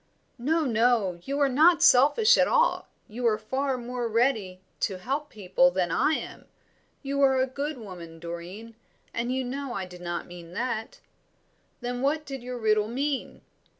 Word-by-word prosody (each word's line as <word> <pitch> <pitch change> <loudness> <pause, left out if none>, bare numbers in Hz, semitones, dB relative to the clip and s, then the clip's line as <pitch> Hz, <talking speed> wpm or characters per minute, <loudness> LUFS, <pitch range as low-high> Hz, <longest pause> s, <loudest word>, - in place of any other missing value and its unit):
"No, 315 +6 +1
no, 225 -6 +2
you 280 +1 -2
are 285 - +4
not 310 +5 +4
selfish 300 - +6
at - - +3
all, - - +2 0.2
you 235 +3 -2
are 215 -2 +2
far 260 +5 -2
more 245 0 -4
ready 220 -5 0 0.2
to 195 -3 -1
help 275 +9 -3
people 185 -3 +2
than 180 -1 -1
I 310 - +2
am. - - -5 0.6
You 280 0 -1
are 265 -1 +4
a 260 - +3
good 280 +3 -4
woman, 180 -7 -10
Doreen, 170 +7 -8 0.4
and 240 +1 -2
you 260 0 -1
know 270 +1 -4
I 190 - -3
did 180 -1 -12
not 175 -1 -4
mean 175 -1 -11
that." 250 - -4 0.8
"Then 245 0 -3
what 305 +3 0
did 270 -3 -6
your 250 0 -6
riddle 215 -2 +2
mean?" 270 +4 -3
245 Hz, 170 wpm, -27 LUFS, 200-275 Hz, 0.8 s, selfish